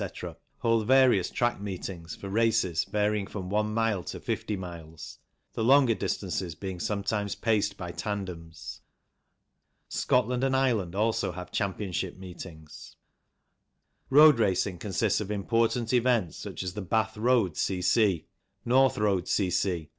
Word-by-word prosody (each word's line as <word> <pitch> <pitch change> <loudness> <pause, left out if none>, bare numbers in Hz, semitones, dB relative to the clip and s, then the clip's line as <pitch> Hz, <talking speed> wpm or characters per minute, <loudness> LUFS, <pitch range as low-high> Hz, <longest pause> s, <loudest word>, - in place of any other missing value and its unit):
hold 115 -2 +2
various 130 -8 +5
track 120 -4 -1
meetings 90 -4 -6
for 100 - -8
races 105 -5 +1
varying 105 0 0
from 95 -2 -6
one 105 +1 +1
mile 110 -4 0
to - - -6
fifty 105 - -3
miles, 80 -4 -9 0.3
the 110 - -2
longer 130 0 +5
distances 95 -4 -3
being 95 +2 -6
sometimes 100 +1 -2
paced 105 -3 0
by 90 -2 -5
tandems. 90 -6 -6 1.1
Scotland 125 0 +1
and 135 0 +2
Ireland 115 -10 +1
also 110 -2 +1
have 90 +1 -8
championship 95 -2 -2
meetings. 85 -4 -11 1.1
Road 150 -1 +7
racing 95 -3 +1
consists 105 +2 0
of 105 - -5
important 115 +3 0
events 120 -9 +2
such - - -6
as 90 -1 -4
the 105 - -5
Bath 110 +4 0
Road 110 -6 +2
C.C., 95 0 +1 0.4
North 130 +2 +4
Road 100 -4 +1
C.C. 90 -4 0
100 Hz, 130 wpm, -28 LUFS, 90-115 Hz, 1.1 s, Road